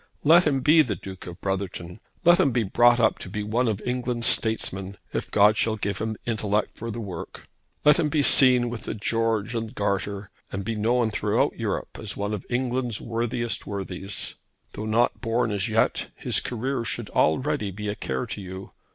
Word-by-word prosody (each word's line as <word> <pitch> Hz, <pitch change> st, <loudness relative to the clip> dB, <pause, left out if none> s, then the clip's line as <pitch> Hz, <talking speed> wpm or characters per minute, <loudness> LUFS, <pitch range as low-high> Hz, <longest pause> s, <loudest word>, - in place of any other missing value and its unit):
Let 165 Hz, +3 st, +6 dB
him 135 Hz, -3 st, +1 dB
be 155 Hz, +4 st, +6 dB
the 120 Hz, -9 st, -1 dB
Duke 95 Hz, +1 st, -10 dB
of 85 Hz, -1 st, -9 dB
Brotherton. 95 Hz, -1 st, -4 dB, 0.3 s
Let 175 Hz, +1 st, +6 dB
him -, -, +4 dB
be 120 Hz, -2 st, 0 dB
brought 120 Hz, +4 st, +4 dB
up 110 Hz, -2 st, +2 dB
to -, -, -8 dB
be 105 Hz, +2 st, -4 dB
one 115 Hz, +4 st, 0 dB
of 105 Hz, -3 st, -1 dB
England's 125 Hz, -1 st, -2 dB
statesmen, 100 Hz, -3 st, 0 dB, 0.2 s
if -, -, -3 dB
God 105 Hz, +1 st, +4 dB
shall 110 Hz, -1 st, +1 dB
give 100 Hz, -2 st, -3 dB
him 110 Hz, 0 st, -3 dB
intellect 105 Hz, -2 st, -1 dB
for 115 Hz, -, -6 dB
the 115 Hz, +1 st, -5 dB
work. 100 Hz, -6 st, -8 dB, 0.4 s
Let 150 Hz, 0 st, +6 dB
him 150 Hz, -, +1 dB
be 150 Hz, -1 st, +1 dB
seen 125 Hz, -3 st, +7 dB
with 120 Hz, -, -6 dB
the -, -, -4 dB
George 115 Hz, +1 st, -1 dB
and 115 Hz, -2 st, -4 dB
Garter, 100 Hz, 0 st, -2 dB, 0.2 s
and 95 Hz, 0 st, -4 dB
be 115 Hz, -, -2 dB
known 115 Hz, +2 st, +1 dB
throughout -, -, 0 dB
Europe -, -, -3 dB
as -, -, -5 dB
one 100 Hz, +1 st, -2 dB
of 105 Hz, -, -5 dB
England's 125 Hz, -2 st, -1 dB
worthiest 115 Hz, 0 st, -3 dB
worthies. 100 Hz, -1 st, -3 dB, 0.4 s
Though 110 Hz, -, -5 dB
not 115 Hz, +3 st, +1 dB
born 115 Hz, -1 st, 0 dB
as 100 Hz, +1 st, -1 dB
yet 110 Hz, 0 st, +1 dB
his -, -, +1 dB
career 125 Hz, +1 st, -3 dB
should -, -, -3 dB
already 130 Hz, -, +1 dB
be 105 Hz, +2 st, -6 dB
a 105 Hz, -, -1 dB
care 125 Hz, -, -3 dB
to 110 Hz, -3 st, -6 dB
you. 95 Hz, 0 st, -8 dB
110 Hz, 195 wpm, -25 LUFS, 100-120 Hz, 0.4 s, seen